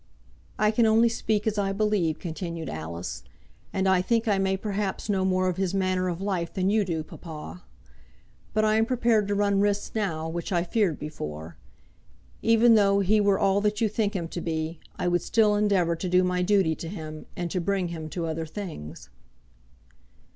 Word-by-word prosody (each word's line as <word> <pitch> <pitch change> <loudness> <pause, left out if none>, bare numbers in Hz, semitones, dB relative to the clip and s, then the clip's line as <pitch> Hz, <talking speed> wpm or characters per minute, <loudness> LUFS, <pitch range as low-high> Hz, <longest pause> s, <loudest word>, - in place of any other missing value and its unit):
"I 215 0 +3
can 225 +1 +3
only 225 +2 +5
speak 215 -2 -1
as 215 -1 0
I 195 -1 0
believe," 200 -6 +1
continued 170 -1 -5
Alice. 80 -2 -5 0.5
"And 190 0 0
I 190 -1 +4
think 230 +4 0
I 200 -2 +2
may 190 0 +1
perhaps 200 0 -3
know 190 -2 +1
more 185 0 +2
of 180 -1 -1
his 190 0 -1
manner 185 -1 +1
of 175 -1 -3
life 190 -4 -2
than 190 +1 0
you 215 0 +3
do, 165 -4 -2
papa. 150 - -9 0.9
But 215 0 +2
I 215 0 +3
am 225 0 +2
prepared 235 -4 +2
to 205 - 0
run 200 -1 +2
risks 205 0 0
now 165 -7 -2
which 170 +4 -4
I 175 -2 +2
feared 185 -3 +1
before. 80 - -7 0.9
Even 230 +1 +5
though 200 -2 +4
he 210 +2 +3
were 200 -1 +3
all 200 -1 +2
that 210 0 0
you 225 - +3
think 215 -1 -1
him 170 -3 -2
to 175 - -5
be, 160 0 -3 0.2
I - - -1
would 175 0 +2
still 215 -2 +3
endeavour 200 -5 +2
to 180 +2 -4
do 180 +1 +4
my 180 0 0
duty 185 -3 +3
to 165 - -6
him, 155 -4 -7
and 175 -1 -3
to 185 - -1
bring 185 0 0
him 160 -2 -6
to 170 +1 -3
other 160 0 -3
things." 155 - -8
190 Hz, 195 wpm, -26 LUFS, 170-210 Hz, 0.9 s, only